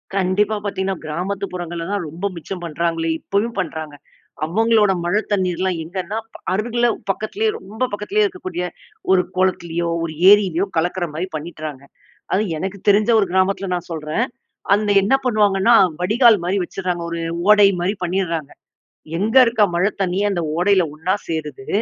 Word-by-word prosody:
கண்டிப்பா. 200 +3 +1
பார்த்தீங்கன்னா 195 -1 -2
கிராமத்து 185 +6 -3
புறங்கள்ல 170 -1 -5
தான், 200 -5 -1
ரொம்ப 170 +6 -6
மிச்சம் 175 +2 -7
பண்ணுறாங்களே. 165 0 -1
இப்பயும் 210 +3 -2
பண்ணுறாங்க. 160 -3 -4 0.5
அவங்களோட 215 +3 +3
மழை 205 +5 +2
தண்ணீர்லாம் 185 -2 0
எங்கன்னா, 185 +5 -4 0.2
ப - - -10 0.2
அருகில 240 +4 0 0.2
பக்கத்திலேயே, 390 - -1
ரொம்ப 215 +6 -5
பக்கத்திலேயே 395 - 0
இருக்கக்கூடிய 370 - -4 0.5
ஒரு 185 - +5
குளத்திலேயோ, 170 -2 0
ஒரு 160 - -4 0.2
ஏரிலயோ, 195 -3 +4
கலக்கிற 175 +2 0
மாரி 170 +5 -3
பண்ணிட்றாங்க. 155 -3 -6 0.5
அதுவும் 190 -3 +1
எனக்கு 190 +5 -4
தெரிஞ்ச 205 +3 +4
ஒரு 205 - +3
கிராமத்துல 190 +1 +1
நான் 175 0 -6
சொல்றேன். 155 +7 -2 0.5
அந்த 210 0 0
என்ன 205 +7 +2
பண்ணுவாங்கன்னா, 215 -1 +3 0.3
வடிகால் 220 +4 +5
மாரி 185 +3 0
வச்சுடுறாங்க. 180 -1 -3
ஒரு 170 - -3 0.3
ஓடை 205 -1 +7
மாரி 190 +4 0
பண்ணிடுறாங்க. 170 -5 -2 0.7
எங்க 220 +6 -1
இருக்க 230 -2 +2
மழை 180 +4 +3
தண்ணியே 190 +2 0
அந்த 175 -3 -1 0.2
ஓடையில 190 +1 +4
ஒன்னா 160 +5 -1
சேருது. 150 -5 -5
190 Hz, 145 wpm, -20 LUFS, 170-205 Hz, 0.7 s, ஓடை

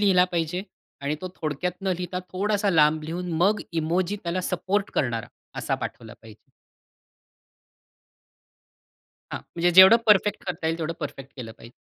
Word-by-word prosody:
लिहिला 190 -3 +5
पाहिजे 170 +2 -1 0.4
आणि 145 +2 -1
तो 185 - -5
थोडक्यात 155 +4 -2
न 195 - -1
लिहिता, 180 0 -2
थोडासा 200 +1 0
लांब 155 -1 +4
लिहून 175 +2 -4
मग 210 +3 +3
इमोजी 170 +5 0
त्याला 175 +1 -2
सपोर्ट 200 +2 -1
करणारा 120 -5 -1 0.3
असा - - -1
पाठवला 110 -2 -7
पाहिजे. 110 -1 -16 2.8
हां, - - -3 0.2
म्हणजे 175 +1 +2
जेवढं 190 +5 +9
परफेक्ट 210 0 +3
करता 160 -2 -3
येईल 165 +1 -1
तेवढं 165 0 -2
परफेक्ट 135 0 -7
केलं 115 -3 -7
पाहिजे. 115 - -13
175 Hz, 140 wpm, -25 LUFS, 155-190 Hz, 2.8 s, जेवढं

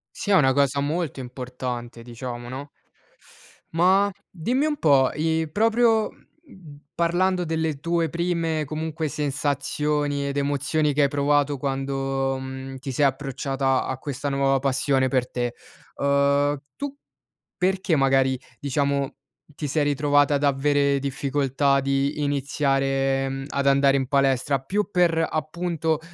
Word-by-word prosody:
Sì 205 - -5
è 195 - +5
una 135 -6 +5
cosa 140 0 +2
molto 145 -2 -2
importante 125 -2 -6
diciamo, 120 0 -7
no? 135 +4 -7 1.1
Ma, 190 +4 +4 0.2
dimmi 245 - -1
un 295 - -1
po' 140 - +4
i 160 0 0
proprio, 225 +2 +3
mhmm, 185 - -17
parlando 180 +2 +1
delle 160 -3 -2
tue 170 +1 0
prime, 165 -2 -1
comunque, 155 +1 -3
sensazioni 145 0 -1
ed 140 0 -3
emozioni 145 +1 0
che 145 - +2
hai - - +5
provato 145 0 +1
quando, 135 0 -1
mhmm, 130 0 -7
ti 135 +1 -6
sei 145 +3 +2
approcciata 135 -1 0
a 130 - -3
questa 140 +1 -4
nuova 135 0 +2
passione 135 0 +1
per 130 -1 0
te, 120 -1 -3 0.4
uhm, 140 +1 +2 0.2
tu 285 0 -5 0.6
perché 185 -2 +1
magari, 135 -1 +2 0.2
diciamo, 140 0 -1 0.4
ti 150 - -5
sei 145 +1 +1
ritrovata 145 0 +3
ad 140 - -1
avere 140 0 +2
difficoltà 140 0 0
di 140 +2 0
iniziare, 135 -1 0
mhmm, 135 0 -4
ad 140 -1 -1
andare 140 0 +4
in 135 -1 -1
palestra? 135 0 +2
Più 200 +11 -1
per, 165 -2 +3
appunto, 160 0 -2
140 Hz, 135 wpm, -24 LUFS, 135-155 Hz, 1.1 s, è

